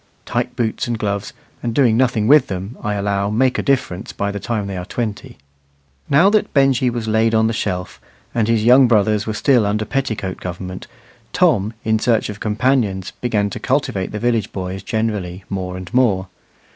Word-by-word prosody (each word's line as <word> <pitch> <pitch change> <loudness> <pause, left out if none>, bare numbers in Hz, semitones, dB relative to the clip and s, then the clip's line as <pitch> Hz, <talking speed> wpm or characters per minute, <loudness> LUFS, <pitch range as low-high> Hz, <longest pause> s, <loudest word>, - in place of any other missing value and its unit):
Tight 125 +1 -2
boots 115 -2 -1
and 120 -1 -1
gloves, 100 -2 -2 0.3
and 115 -1 -3
doing 125 -6 +4
nothing 120 -3 +2
with 140 +3 +6
them, 95 +5 -5
I 105 -2 -2
allow 100 0 0
make 125 +4 +1
a - - +1
difference 130 -9 -1
by 100 0 -2
the 100 - -5
time 105 +1 -2
they 100 -1 -5
are 90 - -4
twenty. 105 +1 -5 0.7
Now 150 +7 +5
that 210 -1 +1
Benjy 135 -2 +3
was 120 -2 -4
laid 110 +1 +2
on 110 0 +4
the 115 - +1
shelf, 90 -4 -3 0.3
and 115 -2 +1
his 115 -2 +2
young 125 +3 +7
brothers 105 -2 +2
were 110 - -2
still 125 -1 +3
under 105 +1 0
petticoat 110 -9 -3
government, 90 +1 -6 0.5
Tom, 105 +4 +2
in 110 0 +2
search 115 -2 +1
of 105 -1 -7
companions, 105 -4 0
began 105 -4 0
to - - -5
cultivate 125 -8 -1
the 105 - -4
village 115 -2 0
boys 95 0 -5
generally 105 -5 -3
more 90 -1 -3
and 95 +4 -9
more. 100 -7 +2
110 Hz, 185 wpm, -19 LUFS, 100-120 Hz, 0.7 s, young